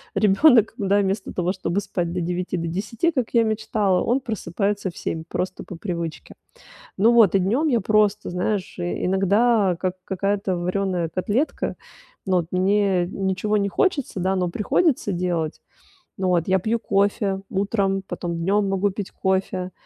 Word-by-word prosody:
ребёнок, 225 +2 +5
да, 200 0 +2
вместо 195 0 -1
того, 180 +1 0
чтобы 185 0 -2
спать 175 -3 -3
до 180 - -2
9, 180 +1 -2
до 165 0 -3
10, 210 - -1
как 255 -7 -1
я 235 -1 +5
мечтала, 215 -4 0
он 245 +3 +1
просыпается 200 -2 -2
в - - -18
7 160 0 -3
просто 185 - -3
по 180 - -9
привычке. 170 -4 -5 0.6
Ну 220 +4 +5
вот, 215 -5 +5
и - - +5
днём 235 - +1
я 235 -6 +2
просто, 210 0 +2
знаешь, 180 +1 -2
э, 175 0 -2
иногда 195 +1 +3
как 185 0 -2
какая-то 195 0 -1
варёная 180 -1 -1
котлетка. 215 - -1 0.5
Ну, 185 -2 +2
вот 170 - -1
мне 190 -1 +2
ничего 195 +3 -1
не 200 0 +1
хочется, 280 - 0
да, 190 +1 +1
но 180 -1 0
приходится 230 - +1
делать. 175 -3 -2 0.6
Ну 190 -1 -1
вот, 170 -2 +1
я 190 0 +3
пью 225 +5 -1
кофе 200 -2 0
утром, 195 -1 0
потом 170 -1 -4
днём 200 +4 +1
могу 195 +1 +1
пить 195 0 -6
кофе. 190 -1 -1
195 Hz, 165 wpm, -23 LUFS, 180-210 Hz, 0.6 s, ребёнок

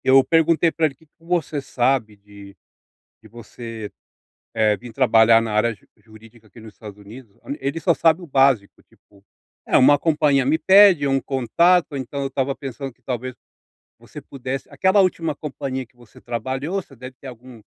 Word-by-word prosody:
Eu 135 0 +5
perguntei 165 +1 +2
para 165 - 0
ele: 135 - -10
"Que 160 - -25
que 145 - -43
você 165 -4 -2
sabe 125 -4 -1
de 100 -1 -15 0.7
de - - -17
você, 115 -1 -9 0.6
eh, 110 -2 +2
vim 120 - -11
trabalhar 115 -2 +4
na 115 -1 -4
área 110 +1 0 0.2
jurídica 110 +1 -19
aqui 115 - -17
nos 110 -2 -13
Estados 105 -2 -12
Unidos?" 105 +1 -14 0.2
Ele 140 +4 -3
só 170 - +2
sabe 165 +2 +2
o - - -9
básico, 135 -8 +1
tipo, 100 -1 -27 0.4
é - - +2
uma 145 +3 +5
companhia 145 -4 +1
me 155 +3 +2
pede 190 -3 +5
ou 135 - 0
um 135 - +1
contato, 155 +6 +1
então 135 +1 -5
eu 135 - -2
estava 135 0 -2
pensando 135 0 -7
que 125 - -40
talvez 125 +1 -5 0.7
você - - -12
pudesse 135 0 -7
aquela 190 +2 +2
última 165 -4 -1
companhia 135 -3 -6
que 120 - -36
você 120 -3 -19
trabalhou 130 +7 -4
você 140 - -19
deve 130 +1 -11
ter - - -17
algum 125 -1 -13
130 Hz, 180 wpm, -21 LUFS, 115-150 Hz, 0.7 s, Eu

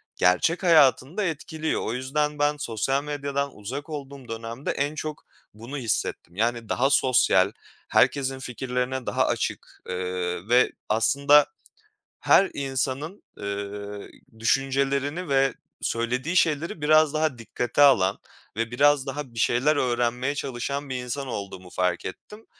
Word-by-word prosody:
gerçek 90 - +2
hayatını 155 -1 +4
da 210 - +1
etkiliyor. 160 -1 -2
O 110 - -2
yüzden 145 +4 -1
ben 145 0 +2
sosyal 135 +1 -1
medyadan 140 -1 -3
uzak 130 +10 -6
olduğum 140 -3 -7
dönemde 115 +3 -4
en 145 +2 -2
çok 155 0 -6 0.3
bunu 115 +7 -8
hissettim. 110 -7 -2
Yani 115 +1 -1
daha 135 +2 +2
sosyal, 120 -8 +4 0.4
herkesin 135 -1 +2
fikirlerine 125 0 -3
daha - - +1
açık, - - -3
ııı, 90 +1 -3
ve 125 +1 +5 0.2
aslında 140 +7 +5 0.7
her 195 - +4
insanın, 140 +6 -3
ııı, 100 0 -5 0.3
düşüncelerini 140 +6 0
ve 135 -2 +3 0.3
söylediği 125 +8 -1
şeyleri 155 -1 +1
biraz 155 0 +4
daha 155 -4 0
dikkate 120 +4 -2
alan 105 -10 +5 0.4
ve 115 +1 -1
biraz 145 +1 +3
daha 135 -2 -5
bir 115 - -6
şeyler 130 +7 +3
öğrenmeye 125 +1 0
çalışan 140 +1 -4
bir 130 - -3
insan 135 +3 -4
olduğumu 100 -5 -6
fark 90 0 -1
ettim. 210 - -9
135 Hz, 130 wpm, -25 LUFS, 115-145 Hz, 0.7 s, ve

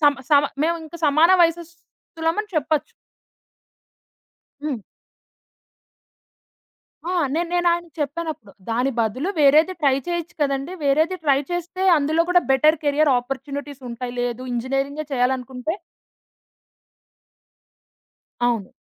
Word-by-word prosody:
సమ 290 -2 +6 0.2
సమ 290 -1 +6 0.2
మేవింక 325 0 -2
సమాన 310 +4 +5
వయసస్తులమని 335 +2 -2
చెప్పచ్చు. 310 -1 0 1.7
హ్మ్. 285 -7 -4 2.3
ఆ! - - -1 0.2
నేన్ 340 +1 -1
నేనాయనకి 345 -2 +1
చెప్పానప్పుడు, 300 -6 -4 0.2
దాని 245 +4 +1
బదులు 235 - 0
వేరేది 305 +5 +5
ట్రై 280 -3 +4
చేయొచ్చు 345 0 -3
కదండీ! 275 +3 -1
వేరేది 315 +6 +2
ట్రై 275 -2 +4
చేస్తే 350 +1 -3
అందులో 310 +3 +2
కూడా 360 0 +5
బెటర్ 300 +4 +5
కేరియర్ 290 +1 +3
ఆపార్చునిటీసుంటయి. 265 -2 -6
లేదు 245 0 -2
ఇంజినీరింగే 270 +5 -2
చేయాలనుకుంటే 255 +3 -1 2.7
అవును. 235 -5 0
295 Hz, 90 wpm, -22 LUFS, 265-330 Hz, 2.7 s, సమ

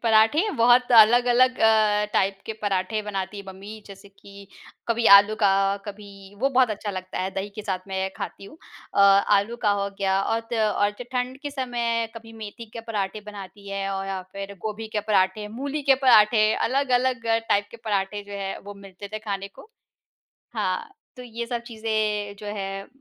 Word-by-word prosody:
पराठे 225 - +4
बहुत 245 +2 +4
अलग-अलग 245 +3 +5
अ, 215 -1 +4
टाइप 195 0 +1
के 220 - -3
पराठे 200 +1 -1
बनाती 195 -1 -4
है - - -7
मम्मी 200 +3 -10
जैसे 200 0 -13
कि 200 0 -15 0.4
कभी 230 0 0
आलू 205 +2 +4
का 200 - +5 0.4
कभी 200 -1 -11
वो 270 - +3
बहुत 255 -3 +3
अच्छा 210 0 -4
लगता 185 -1 -6
है, 190 +1 -2
दही 195 +1 -4
के 215 - -6
साथ 190 -3 -2
मैं 190 0 -2
खाती - - -7
हूँ। 200 - -13 0.4
अ, - - +3
आलू 200 +3 +4
का 210 - +4
हो 200 - -1
गया 195 -1 +1
और 225 +3 0
त - - +1
और 210 -2 +1 0.2
ठंड 250 +1 -2
के 290 - -4
समय 240 -4 -1
कभी 225 0 -11
मेथी 225 +1 -9
के 230 - -5
पराठे 205 -1 -2
बनाती 200 -1 -10
है 195 0 -3
और 195 0 -3
या 195 -1 -3
फ़िर 200 0 -7
गोभी 220 +1 -4
के - - +2
पराठे, 205 0 +1
मूली 280 +7 -4
के 275 -1 +5
पराठे, 215 -2 +6
अलग-अलग 255 -2 0 0.2
टाइप 205 0 +2
के - - -11
पराठे 205 -1 -1
जो 205 0 -12
हैं, 195 -1 -4
वो 205 0 -10
मिलते 200 0 -11
थे 215 - -3
खाने 200 -2 -5
को। 305 - -16 0.9
हाँ, 460 -1 -2 0.3
तो 250 - -9
ये 235 -1 -6
सब 240 -1 -3
चीज़ें 215 -3 -2
जो 210 - -9
हैं 195 -1 -5
210 Hz, 185 wpm, -24 LUFS, 200-230 Hz, 0.9 s, पराठे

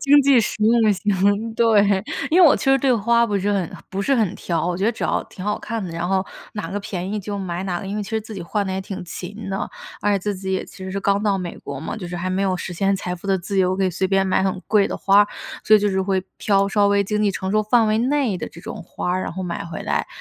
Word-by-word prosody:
经 285 0 +6
济 270 -3 +5
实 215 - -1
用 225 -2 +4
型， 205 +3 +1
对。 205 -4 +4 0.3
因 355 +3 +5
为 345 - +9
我 - - +6
其 - - -5
实 270 0 +5
对 260 -1 +3
花 235 +2 +3
不 205 -2 0
是 205 +2 0
很 190 -4 -1 0.2
不 195 +1 -3
是 275 - +2
很 210 -5 +1
挑， 170 -3 -2
我 175 -1 -1
觉 195 - -1
得 230 - +3
只 - - -8
要 - - 0
挺 185 - -10
好 210 - -1
看 225 -1 -4
的， 175 - -5
然 170 +2 -3
后 190 0 +1 0.3
哪 195 -5 -5
个 205 - -2
便 185 -1 -4
宜 215 - -1
就 200 0 -4
买 180 -1 -3
哪 180 -2 -2
个， - - -7
因 200 +2 -3
为 210 - -2
其 200 - -8
实 220 0 0
自 215 0 -9
己 185 - -5
换 200 +3 -2
得 190 - -2
也 190 - -2
挺 190 -1 -6
勤 195 +5 -7
的。 195 - -2 0.3
而 205 0 +2
且 - - +1
自 205 +2 -2
己 190 0 -4
也 190 - -1
其 - - -15
实 190 - -5
是 200 - -2
刚 200 +1 +1
到 200 -2 +1
美 175 -2 -5
国 140 - -7
嘛， 160 - -5
就 185 -5 -6
是 175 - -5
还 180 +2 -3
没 190 +1 0
有 185 -2 +1
实 175 - -5
现 195 +3 +1
财 180 -1 -4
富 180 +3 -10
的 190 -1 +2
自 195 +2 -3
由， 185 0 +2
可 195 - +1
以 185 - +1
随 185 +2 -1
便 195 0 +2
买 190 - +2
很 190 -1 -1
贵 210 -1 +4
的 - - -3
花 200 +1 +5
儿， 205 - +3 0.4
所 215 - +7
以 - - +1
就 205 - +2
是 190 -1 0
会 190 -1 0 0.2
挑 200 -1 +2
稍 205 0 +3
微 200 0 +3
经 210 +1 -1
济 205 - +3
承 190 0 -3
受 215 +1 +2
范 225 +2 +3
围 215 +1 +2
内 255 -4 +1
的 - - -5
这 170 - -13
种 175 - -7
花 180 +1 -4
儿。 185 - -1
然 - - -4
后 190 +2 -5
买 170 -2 -4
回 165 -1 -6
来 - - -1
195 Hz, 330 characters per minute, -22 LUFS, 185-215 Hz, 0.4 s, 为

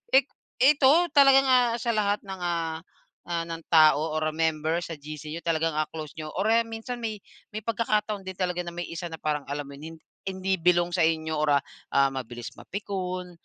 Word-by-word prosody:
I - - +10 0.4
ito 275 0 +6 0.2
talaga 275 -1 +8
nga 255 -1 +5 0.2
sa 235 - -2
lahat 205 -1 +1
ng 190 -1 -7
ah 165 -2 -1 0.5
ah, 170 -1 -2
ng 165 0 -5
tao 155 0 +5
or 155 - +1
member 160 0 0
sa 165 - -6
GC 150 +1 -8
yung 170 - -5
talagang 165 -1 +1
ah, 155 0 0
close 155 -2 -7
niyo 155 -1 -5
or 195 - 0
eh, 230 - +5
minsan 225 +2 -6
may 220 -2 -3 0.3
may 215 +1 -6
pagkakataon 215 -2 0
din 190 - -6
talaga 180 -1 -1
na 170 - -5
may 175 0 -3
isa 170 +1 -5
na 160 - -7
parang 150 -2 -1
alam 145 0 -3
mo 140 - -10
yon, 160 +2 -9 0.3
hindi 190 0 -1
belong 175 0 +2
sa 180 - +1
inyo 160 -1 0
or 150 -2 +2
ah, - - -39 0.3
ah, 140 0 +4
mabilis 120 -2 -6
mapikon, 185 -2 -4
170 Hz, 200 wpm, -26 LUFS, 155-200 Hz, 0.5 s, I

